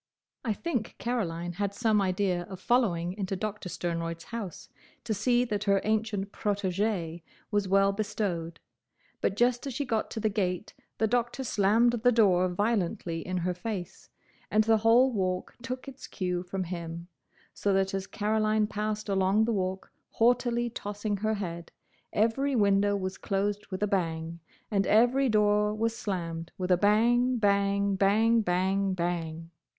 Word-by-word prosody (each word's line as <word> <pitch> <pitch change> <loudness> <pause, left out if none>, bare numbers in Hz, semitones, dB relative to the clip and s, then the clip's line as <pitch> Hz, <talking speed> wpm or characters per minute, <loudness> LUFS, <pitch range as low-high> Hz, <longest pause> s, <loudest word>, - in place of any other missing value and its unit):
I 225 - 0
think 245 -4 -3
Caroline 175 -8 -2
had 200 +2 -2
some 220 -2 +2
idea 185 -1 0
of 190 -2 -8
following 180 -6 +1
into 195 -1 -2
Doctor 205 -1 -4
Sternroyd's 165 -1 -3
house 220 -7 -7 0.4
to 225 - -1
see 240 +4 +2
that 210 -3 -2
her 200 -1 +4
ancient 215 -2 -1
protégé 195 -4 -1 0.3
was 205 -2 +1
well 195 +1 +4
bestowed, 190 -5 -3 0.6
but 195 - +1
just 245 +4 +2
as 265 - -5
she 285 - -1
got 225 -4 -1
to 225 - -5
the 220 - +1
gate 195 -2 -2 0.2
the 220 - +2
Doctor 240 +3 0
slammed 225 +1 +3
the 245 +1 +5
door 185 -6 +4
violently 180 -4 -1
in 185 +2 -3
her 180 +1 -1
face; 180 -1 -6 0.4
and 215 +1 +4
the 225 0 +4
whole 230 +4 +5
Walk 185 -4 -2
took 255 +2 -5
its 270 -1 -9
cue 180 -2 -2
from 185 +1 -4
him, 170 -1 -6 0.5
so 205 - 0
that 195 0 +1
as 195 0 -3
Caroline 215 0 +1
passed 210 +1 -3
along 195 +2 +2
the 230 - 0
Walk 190 -1 -3 0.2
haughtily 240 0 +2
tossing 205 -1 -3
her 215 +2 0
head, 170 -4 -5 0.4
every 255 +6 +1
window 205 -2 +3
was 185 -1 -4
closed 205 +1 -1
with 190 +1 -4
a - - +2
bang, 165 -3 -2 0.3
and 195 -2 +1
every 245 +5 +4
door 210 -1 +3
was 225 +1 0
slammed 170 -5 -4
with 185 0 -2
a - - +7
bang, 240 +5 +3
bang, 200 -1 +2
bang, 220 +4 +3
bang, 190 +1 +1
bang! 165 -2 -3
205 Hz, 155 wpm, -28 LUFS, 185-220 Hz, 0.6 s, a